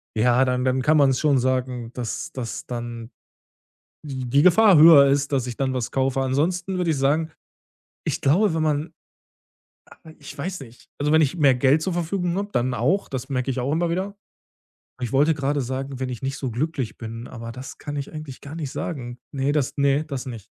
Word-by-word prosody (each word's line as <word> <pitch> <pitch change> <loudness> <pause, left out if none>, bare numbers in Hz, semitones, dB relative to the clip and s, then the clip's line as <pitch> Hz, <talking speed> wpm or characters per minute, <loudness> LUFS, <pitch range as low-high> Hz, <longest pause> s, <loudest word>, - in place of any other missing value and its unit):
ja, 120 +3 +3
dann 125 0 0
dann 130 0 +1
kann 155 +4 +3
man's 135 -3 +4
schon 145 -3 +3
sagen, 125 -2 -1
das 120 -3 -5
das 120 -3 -5
dann, 120 -1 -6 0.9
die 135 -4 -5
die 140 +3 +4
Gefahr 185 +1 +6
höher 150 -3 +9
ist, 140 +1 +1
dass 130 -3 +1
ich 120 -2 -6
dann 130 -1 0
was 125 -3 -2
kaufe. 135 0 0
Ansonsten 175 +8 -1
würde 175 -2 +1
ich 155 - +1
sagen, 155 +4 +1 0.7
ich - - -2
glaube, 170 +8 +3
wenn 160 - 0
man 155 +1 -1 0.9
aber 160 -1 -16
ich 145 0 -11
weiß 180 +6 -4
nicht. 125 -2 -14
Also, 150 +1 0
wenn 160 - +5
ich 145 +3 0
mehr 140 -5 +5
Geld 135 +5 +3
zur 185 - -1
Verfügung 175 +1 -1
habe, 205 0 -3
dann 125 +1 0
auch, 165 +13 0
das 130 -1 -5
merke 130 -1 -1
ich 130 - -5
auch 130 +4 -1
immer 170 +2 0
wieder. 190 +4 -3 0.9
Ich 120 -2 -3
wollte 145 +4 +4
gerade 145 0 -1
sagen: 130 +1 -4
„Wenn 130 - -2
ich 125 -3 -6
nicht 135 +1 -2
so 130 - -3
glücklich 135 0 -3
bin“, 115 +1 -7
aber 115 -2 -8
das 130 +3 -9
kann 145 - -6
ich 140 -1 -5
eigentlich 155 -4 -8
gar 145 +2 -9
nicht 150 -5 -4
sagen. 120 -7 -5
Ne, 135 0 0
das 145 -3 0
ne, 140 +1 +2
das 140 -4 -5
nicht. 115 -6 -7
140 Hz, 205 wpm, -23 LUFS, 125-155 Hz, 0.9 s, höher